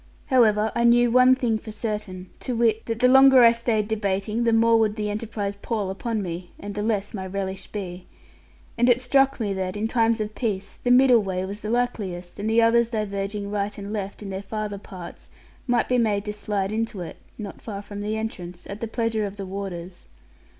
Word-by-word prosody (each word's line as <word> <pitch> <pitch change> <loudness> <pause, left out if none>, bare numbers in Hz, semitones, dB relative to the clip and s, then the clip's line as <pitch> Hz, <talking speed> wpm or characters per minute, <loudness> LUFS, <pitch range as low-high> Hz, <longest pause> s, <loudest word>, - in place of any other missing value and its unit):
However, 220 -4 +4
I 235 - 0
knew 240 0 +5
one 255 +1 +6
thing 230 -4 0
for 215 - -9
certain, 210 -4 -5
to 250 - -3
wit, 225 -1 +1
that 230 -1 -2
the 250 +2 +4
longer 265 0 +8
I 230 - +8
stayed 230 -3 0
debating 210 +1 -1
the 230 - +4
more 230 0 +4
would 215 -1 +2
the 210 -1 -2
enterprise 205 -2 -4
pall 210 -4 -2
upon 215 +2 -3
me, 175 0 -5
and 205 0 -6
the 205 - -3
less 210 -2 -1
my 190 -3 -4
relish 190 0 -4
be. 180 -3 -6 0.7
And 240 +1 +4
it 245 0 +5
struck 270 +2 +2
me 205 -3 -1
that, 190 0 -3
in 215 +2 0
times 230 -1 +2
of 215 0 -3
peace, 200 -5 -3
the 245 - -2
middle 250 -2 +6
way 190 -2 -2
was 200 +2 -7
the 210 - -4
likeliest; 205 -7 -2
and 210 +2 -1
the 230 +1 +4
others 235 0 +4
diverging 200 -2 -3
right 205 0 -2
and 200 +1 -6
left 205 0 -5
in 195 - -6
their 190 0 -4
farther 210 0 -4
parts 180 -3 -10 0.4
might 240 -1 +2
be 250 -1 +2
made 210 -3 +1
to 210 - -3
slide 205 -2 -2
into 220 -3 -2
it 170 - -7 0.2
(not 205 -3 -8
far 205 -2 -6
from 205 0 -7
the 215 +1 -2
entrance), 180 -5 -6
at 200 +1 -7
the 230 - -2
pleasure 225 -2 -1
of 195 - -8
the 200 -1 -6
warders. 185 -2 -7
210 Hz, 215 wpm, -24 LUFS, 200-230 Hz, 0.7 s, longer